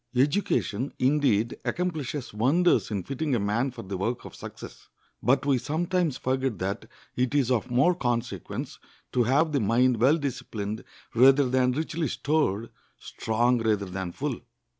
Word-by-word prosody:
Education, 135 - +1
indeed, 125 -5 +2
accomplishes 155 -8 -3
wonders 145 +12 +3
in 100 -4 -2
fitting 140 - -2
a - - +1
man 105 +6 0
for 120 -2 -9
the 95 0 -5
work 115 +5 -2
of - - -9
success, - - -10 0.3
but 135 +2 +2
we 135 -3 +3
sometimes 165 +1 0
forget 130 -3 -1
that 100 +5 -3 0.3
it 125 +2 0
is 130 -3 +2
of 125 0 0
more 135 +9 +4
consequence 120 -8 -3 0.3
to 120 -2 +2
have 145 +6 +3
the 145 - +1
mind 120 +3 +3
well 135 +8 +4
disciplined 110 -7 -4 0.3
rather 135 +3 +6
than 125 0 +2
richly 160 +2 -2
stored,—strong 120 -2 -1
rather 105 -3 +1
than 95 -1 -5
full. - - -3
125 Hz, 145 wpm, -27 LUFS, 115-145 Hz, 0.3 s, rather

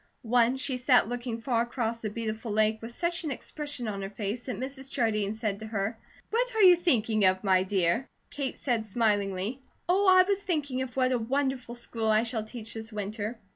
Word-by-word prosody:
Once 245 +2 +3
she 265 -2 0
sat 250 -1 +4
looking 240 -1 -3
far 235 -1 +1
across 235 -1 -2
the 215 - -2
beautiful 220 +1 -4
lake 215 +1 +2
with 230 +1 -7
such 345 +7 -1
an 310 - -2
expression 290 -3 -4
on 200 -2 -3
her 195 - -4
face 210 +3 -4
that 255 - -4
Mrs. 265 +1 -5
Jardine 215 -4 0
said 215 -3 -2
to 220 - -7
her: 215 +1 -2 0.4
"What - - 0
are 440 - +3
you 365 -1 +9
thinking 230 - +1
of, 185 +1 +3
my 190 -2 +4
dear?" 190 +5 +1 0.2
Kate 275 -2 -3
said 240 -5 0
smilingly: 205 +1 0 0.3
"Oh, 380 +3 +3
I 370 0 +8
was 400 -1 +1
thinking 295 -9 -2
of 255 -1 -5
what 255 -1 +3
a 250 - +2
wonderful 255 0 -1
school 230 -2 -3
I 215 0 +4
shall 230 -2 -1
teach 225 0 -7
this 225 0 -7
winter." 210 +2 -4
235 Hz, 205 wpm, -28 LUFS, 215-265 Hz, 0.4 s, you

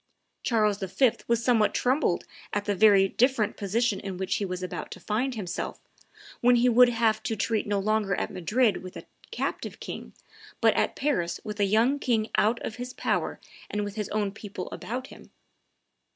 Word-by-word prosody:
Charles 210 -4 +1
V. 215 +6 +2 0.2
was 235 0 +1
somewhat 225 -4 +3
troubled 260 +5 +1 0.3
at 205 0 -1
the 205 - +1
very 200 -1 +6
different 240 0 +1
position 210 +1 0
in 195 -2 -6
which 190 0 -1
he 205 - -1
was 185 -1 -4
about 185 - -5
to - - -9
find 245 +5 -1
himself, 185 -5 -4 0.6
when 245 0 +5
he 240 +1 +4
would 245 +1 +6
have 225 -2 +1
to 225 - -2
treat 220 +1 -1
no 205 0 +1
longer 205 -1 +1
at - - -3
Madrid 210 +4 +2
with 185 0 -9
a - - -10 0.2
captive - - -4
king, - - -7 0.5
but - - +4
at - - 0
Paris 220 -13 -1
with 210 0 -6
a 200 - +4
young 230 +8 +3
king 225 -5 0
out 225 +3 +3
of 220 - -5
his 250 +1 -6
power - - -1 0.3
and 210 0 -2
with 205 -1 -5
his 210 -2 -4
own 205 -2 -1
people 200 -3 -7
about 250 +3 -5
him. - - -15
215 Hz, 185 wpm, -27 LUFS, 200-240 Hz, 0.6 s, very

